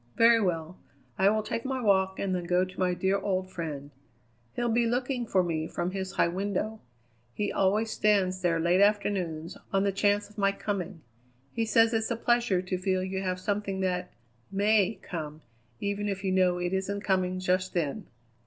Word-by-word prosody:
"Very 230 0 +6
well. 170 -2 -2 0.4
I 190 +1 +5
will 215 +1 +1
take 225 +2 -3
my 265 0 -2
walk 190 -4 +2
and 195 -1 -1
then 180 -1 -2
go 180 +1 +2
to 185 - -12
my 180 -1 +1
dear 190 +3 +1
old 185 -1 -2
friend. 150 -5 -5 0.6
He'll 240 - 0
be 235 0 +2
looking 245 0 -1
for 185 -3 +3
me 160 -2 -2
from 175 +2 -3
his 190 0 -4
high - - +3
window. 200 +4 -2 0.6
He 205 - -1
always 210 +3 +1
stands 190 -3 +2
there 170 -2 +1
late 175 +3 +3
afternoons, 190 -5 0
on 195 0 +2
the 200 - +2
chance 205 +1 +1
of 210 0 -12
my 195 0 +3
coming. 195 -4 -4 0.5
He 230 -1 0
says 225 +1 +4
it's 225 -1 0
a 235 - 0
pleasure 235 -5 +1
to 185 0 -3
feel 185 0 0
you 190 0 -3
have 185 -1 -2
something 200 0 -2
that 180 -1 -1 0.4
may 205 +1 +2
come, 155 -2 -6 0.4
even 200 +1 -2
if 195 -1 -4
you 190 - 0
know 185 -1 +3
it 175 +1 -2
isn't 195 +1 -2
coming 185 -2 0
just 185 0 0
then." 170 +4 -2
190 Hz, 190 wpm, -28 LUFS, 180-210 Hz, 0.6 s, Very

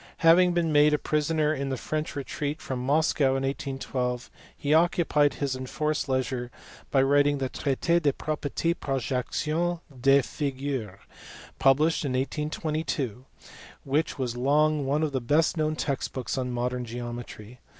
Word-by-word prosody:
Having 175 +2 +6
been 170 -2 +1
made 150 0 +5
a - - 0
prisoner 155 +1 +1
in 140 -2 -3
the 130 - -2
French 155 +5 -3
retreat 145 +1 -3
from 125 -2 -4
Moscow 140 -1 +2
in 135 - -2
1812 135 -2 -3 0.3
he 145 +1 0
occupied 160 -3 +3
his 140 -2 -2
enforced 145 +3 -2
leisure 130 -2 -1 0.4
by 135 -2 +3
writing 145 +1 +3
the 135 -1 -2
Traite 160 +7 0
des 145 -3 +3
proprietes 155 +3 -2
projectiles 150 +6 -1 0.2
des 135 +1 +5
figures, 135 -8 -3 0.6
published 150 +5 +3
in 135 -3 -2
1822, 145 -3 -2 0.6
which 145 +4 0
was 125 -3 -2
long 145 +3 +2
one 145 +3 +1
of 155 - 0
the 130 -2 -1
best 150 +9 +2
known 155 -1 0
text 140 -3 -2
books 130 -2 -3
on 130 -2 -2
modern 125 +1 -2
geometry. 120 -1 -7
140 Hz, 145 wpm, -27 LUFS, 130-155 Hz, 0.6 s, Having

